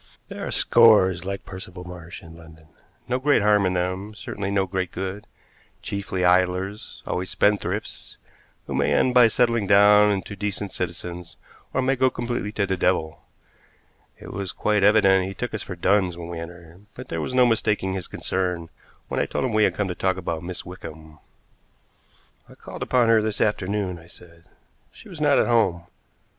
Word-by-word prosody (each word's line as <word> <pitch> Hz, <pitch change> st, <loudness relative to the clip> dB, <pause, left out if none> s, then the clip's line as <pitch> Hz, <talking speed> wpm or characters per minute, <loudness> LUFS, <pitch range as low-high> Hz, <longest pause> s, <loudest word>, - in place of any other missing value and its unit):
There -, -, -6 dB
are -, -, -4 dB
scores 95 Hz, -6 st, +4 dB
like 100 Hz, 0 st, -5 dB
Percival 95 Hz, -1 st, -9 dB
Marsh 90 Hz, -1 st, -10 dB
in 80 Hz, 0 st, -13 dB
London; 80 Hz, -1 st, -15 dB, 0.4 s
no 125 Hz, +1 st, 0 dB
great 140 Hz, -5 st, +3 dB
harm 105 Hz, -2 st, +4 dB
in 90 Hz, -, -1 dB
them, 95 Hz, +4 st, -3 dB
certainly 100 Hz, -2 st, -5 dB
no 100 Hz, -1 st, +1 dB
great 95 Hz, -1 st, -3 dB
good; 95 Hz, +2 st, -5 dB, 0.6 s
chiefly 100 Hz, -2 st, -3 dB
idlers, 90 Hz, +3 st, 0 dB
always 90 Hz, +1 st, -3 dB
spendthrifts, 105 Hz, 0 st, -1 dB, 0.5 s
who -, -, -6 dB
may -, -, +1 dB
end 130 Hz, -, +2 dB
by 125 Hz, -2 st, +7 dB
settling 115 Hz, -2 st, +1 dB
down 105 Hz, +1 st, +6 dB
into 100 Hz, 0 st, -3 dB
decent 100 Hz, 0 st, -4 dB
citizens 85 Hz, -2 st, -6 dB, 0.4 s
or 130 Hz, -, 0 dB
may 135 Hz, +1 st, +2 dB
go 130 Hz, 0 st, +3 dB
completely 120 Hz, -4 st, -3 dB
to 100 Hz, -, 0 dB
the 95 Hz, 0 st, -1 dB
devil. 85 Hz, -3 st, 0 dB, 1.0 s
It -, -, -10 dB
was 100 Hz, -2 st, -4 dB
quite 105 Hz, -1 st, +1 dB
evident 95 Hz, -3 st, +4 dB
he 95 Hz, -, -7 dB
took 125 Hz, -, -4 dB
us 110 Hz, -, -3 dB
for 90 Hz, -, -7 dB
duns 90 Hz, 0 st, +1 dB
when 85 Hz, -1 st, -7 dB
we 85 Hz, -1 st, -5 dB
entered, 85 Hz, +2 st, -11 dB
but 125 Hz, 0 st, -10 dB
there -, -, -3 dB
was 125 Hz, -, -4 dB
no 125 Hz, -1 st, +6 dB
mistaking 105 Hz, -4 st, +1 dB
his 95 Hz, -2 st, -5 dB
concern 90 Hz, -3 st, -3 dB, 0.4 s
when -, -, -2 dB
I -, -, 0 dB
told -, -, -2 dB
him 125 Hz, -, -2 dB
we 110 Hz, -1 st, +4 dB
had -, -, 0 dB
come 105 Hz, -, -1 dB
to 90 Hz, -, -3 dB
talk 95 Hz, +1 st, -1 dB
about 85 Hz, -3 st, -4 dB
Miss 90 Hz, +1 st, -6 dB
Wickham. 80 Hz, -3 st, -11 dB, 1.3 s
"I -, -, -15 dB
called -, -, -10 dB
upon 125 Hz, -2 st, +2 dB
her 115 Hz, -1 st, +5 dB
this 110 Hz, -1 st, -3 dB
afternoon," 100 Hz, -3 st, -1 dB
I 85 Hz, -, -16 dB
said. 85 Hz, -1 st, -15 dB, 0.5 s
"She 220 Hz, -, -15 dB
was 170 Hz, -5 st, -9 dB
not 145 Hz, -2 st, +4 dB
at -, -, +3 dB
home. 105 Hz, -8 st, +2 dB
95 Hz, 185 wpm, -24 LUFS, 90-105 Hz, 1.3 s, by